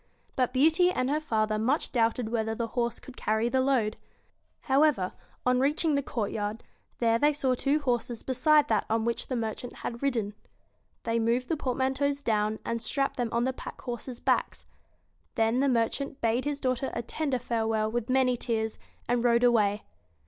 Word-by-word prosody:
But 255 -2 +1
Beauty 320 +7 +4
and 260 -6 0
her 300 - +1
father 215 -7 0
much 255 +8 0
doubted 230 -1 +1
whether 220 -1 -1
the 230 0 -3
horse 235 0 -1
could 260 - -12
carry 220 0 0
the 260 +1 +2
load. 250 -5 +1 0.6
However, 270 -9 +2 0.3
on 250 0 +3
reaching 300 +4 +2
the 280 - +2
courtyard, 215 -3 -3 0.3
there 230 -1 +2
they 295 +3 +4
saw 270 -3 +1
two 275 +4 +1
horses 240 -4 -2
beside 290 +3 +3
that 215 -2 +1
on 225 0 +1
which 235 0 -2
the 255 - -2
merchant 230 +1 -4
had 235 0 -4
ridden. 230 -7 -1 0.7
They 230 0 0
moved 235 +2 0
the 325 - +1
portmanteaus 270 +1 0
down, 215 -4 0
and 230 0 -2
strapped 275 +4 -1
them 240 -2 -1
on 235 +1 +1
the 260 +1 0
pack - - -9
horses' 245 0 -6
backs. - - 0 0.7
Then 225 +2 +2
the 275 +1 +3
mer 230 -3 +3
chant 280 0 -6
bade 235 +3 +1
his 290 -1 -2
daughter 255 0 -1
a 235 - -2
tender 280 +2 -1
farewell 220 -2 -1
with 240 +1 -2
many 255 -1 +3
tears, 220 -2 -2 0.3
and 240 0 +1
rode 235 0 +3
away. 215 -4 +3
245 Hz, 180 wpm, -28 LUFS, 225-270 Hz, 0.7 s, Beauty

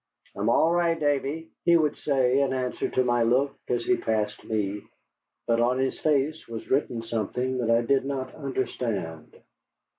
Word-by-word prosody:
"I'm 100 +3 0
all 160 +7 +4
right, 170 -1 +2
Davy," 145 +2 -1
he 170 -1 +5
would 150 -3 +1
say, 135 -2 +2
in 135 -1 +1
answer 130 -1 -2
to 130 - +1
my 120 -1 +2
look 130 +5 +2
as 120 -1 -1
he 185 - +3
passed 105 -2 -2
me. 105 -2 -2 0.6
But 115 0 +2
on 125 +2 +2
his 130 0 -1
face 155 +1 0
was 115 -1 -7
written 125 -4 0
something 120 +3 -2
that 115 -2 -1
I 115 +1 +4
did 135 +2 +2
not 135 -1 -4
understand. 115 - -4
130 Hz, 170 wpm, -26 LUFS, 115-140 Hz, 0.6 s, he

